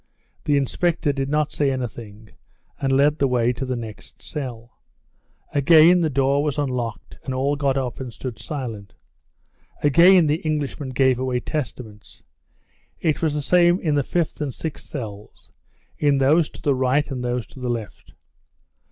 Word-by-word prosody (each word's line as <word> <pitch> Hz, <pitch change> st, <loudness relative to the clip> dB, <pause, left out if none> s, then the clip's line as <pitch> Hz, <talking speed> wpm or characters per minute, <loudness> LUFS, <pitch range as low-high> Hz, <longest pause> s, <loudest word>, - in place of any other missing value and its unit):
The 145 Hz, -1 st, +3 dB
inspector 150 Hz, +2 st, 0 dB
did 135 Hz, 0 st, -2 dB
not 150 Hz, 0 st, 0 dB
say 145 Hz, -2 st, +1 dB
anything 110 Hz, -4 st, -6 dB, 0.5 s
and 135 Hz, -1 st, 0 dB
led 145 Hz, +3 st, +3 dB
the 140 Hz, -, +3 dB
way 125 Hz, -1 st, +1 dB
to 130 Hz, +2 st, -5 dB
the 130 Hz, -, -1 dB
next 115 Hz, -3 st, -9 dB
cell. 120 Hz, -5 st, -7 dB, 0.7 s
Again 165 Hz, +5 st, +6 dB
the 160 Hz, -, +1 dB
door 140 Hz, 0 st, +2 dB
was 150 Hz, -2 st, -1 dB
unlocked, 125 Hz, -6 st, -3 dB
and 130 Hz, -, -4 dB
all 140 Hz, +3 st, +1 dB
got 140 Hz, -1 st, 0 dB
up 130 Hz, -3 st, -3 dB
and 130 Hz, -2 st, -6 dB
stood 120 Hz, 0 st, -7 dB
silent. 115 Hz, -9 st, -6 dB, 0.9 s
Again 170 Hz, +4 st, +6 dB
the 150 Hz, +1 st, +1 dB
Englishman 150 Hz, -3 st, -3 dB
gave 130 Hz, -1 st, +2 dB
away 130 Hz, -1 st, -1 dB
Testaments. 120 Hz, -7 st, -6 dB, 0.8 s
It 155 Hz, -3 st, 0 dB
was 155 Hz, -3 st, 0 dB
the 150 Hz, -, -2 dB
same 175 Hz, +4 st, +4 dB
in 155 Hz, -3 st, 0 dB
the 145 Hz, -, +2 dB
fifth 170 Hz, +2 st, -2 dB
and 145 Hz, -2 st, -2 dB
sixth 155 Hz, +3 st, -7 dB
cells, 105 Hz, -7 st, -9 dB, 0.5 s
in 145 Hz, -2 st, +3 dB
those 150 Hz, +4 st, +3 dB
to -, -, -14 dB
the 145 Hz, -, +3 dB
right 130 Hz, +3 st, +1 dB
and 125 Hz, -2 st, -4 dB
those 120 Hz, -1 st, -2 dB
to -, -, -12 dB
the 125 Hz, -1 st, -3 dB
left. 115 Hz, -6 st, -6 dB
135 Hz, 165 wpm, -22 LUFS, 125-150 Hz, 0.9 s, Again